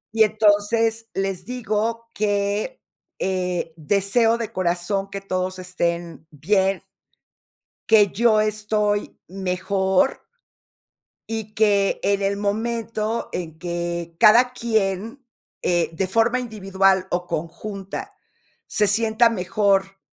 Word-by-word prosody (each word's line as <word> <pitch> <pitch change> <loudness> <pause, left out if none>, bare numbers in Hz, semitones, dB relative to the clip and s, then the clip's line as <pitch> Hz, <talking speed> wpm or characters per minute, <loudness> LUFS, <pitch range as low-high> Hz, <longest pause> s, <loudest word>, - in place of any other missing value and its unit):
Y 220 - +6
entonces, 220 +2 +2
les 195 -1 -2
digo, 230 -1 -2
que, 205 - -1 0.4
eh, 180 -3 -2
deseo 200 +8 +2
de 230 -2 -4
corazón 185 +2 -1
que 195 0 -6
todos 185 -1 -2
estén, 170 -3 -3
bien 190 +5 0 1.1
que 215 -2 +7
yo 220 0 +4
estoy 210 -1 0
mejor 190 +3 0 1.1
y 220 -1 -5
que 205 -2 +2
en 200 0 +1
el 200 0 0
momento 220 +1 -2
en 160 -3 -5
que 170 -1 -4
cada 245 +4 +6
quien, 225 +1 -2 0.4
eh, 175 -1 +1
de 185 +3 -1
forma 230 +5 +2
individual 195 -5 +1
o 175 0 -1
conjunta, 195 - -5 0.6
se 210 -1 +1
sienta 225 +2 +3
mejor 195 -1 0
200 Hz, 105 wpm, -22 LUFS, 185-220 Hz, 1.1 s, que